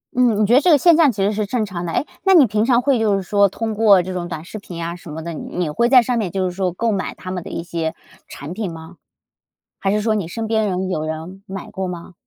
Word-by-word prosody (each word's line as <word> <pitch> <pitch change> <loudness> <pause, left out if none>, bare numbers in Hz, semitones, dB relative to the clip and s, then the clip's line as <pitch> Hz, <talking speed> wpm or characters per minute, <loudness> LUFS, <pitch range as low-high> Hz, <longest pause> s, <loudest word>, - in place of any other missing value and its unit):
嗯， 240 -4 +3
你 - - +4
觉 225 - +2
得 265 - +6
这 360 - +3
个 305 - +7
现 335 +3 +5
象 310 -5 +5
其 200 -3 -2
实 205 - +2
是 210 0 -1
正 225 0 -1
常 175 -3 -5
的。 165 - -3
诶， - - 0 0.2
那 385 -1 +4
你 295 -6 +8
平 210 0 0
常 245 -1 +3
会 265 -2 +2
就 210 -2 +2
是 195 - -1
说 200 +1 +3
通 225 +2 -3
过 210 -3 +5
这 185 +1 -5
种 175 -1 -4
短 160 -1 -6
视 215 - -8
频 180 -3 -10
呀 170 +1 -4
什 175 -2 -12
么 160 +1 -6
的， 170 -1 -5
你 170 +1 -4
会 235 +9 +1
在 255 -2 +7
上 245 0 -1
面 195 -5 -1
就 190 -1 -1
是 180 - -5
说 185 -2 0
购 225 +5 -1
买 195 -2 -3
他 185 - -8
们 180 -2 -4
的 - - -8
一 170 - -4
些 165 -2 -3 0.3
产 145 +5 -8
品 200 -3 -4
吗？ 165 +1 -11 0.8
还 195 - 0
是 210 +1 +1
说 220 0 +1
你 195 -6 -2
身 225 +5 -4
边 220 -1 +1
人 185 0 -2
有 155 -4 -1
人 160 +5 -6
买 195 0 -7
过 190 -1 -4
吗？ 175 0 -8
195 Hz, 315 characters per minute, -20 LUFS, 175-225 Hz, 0.8 s, 你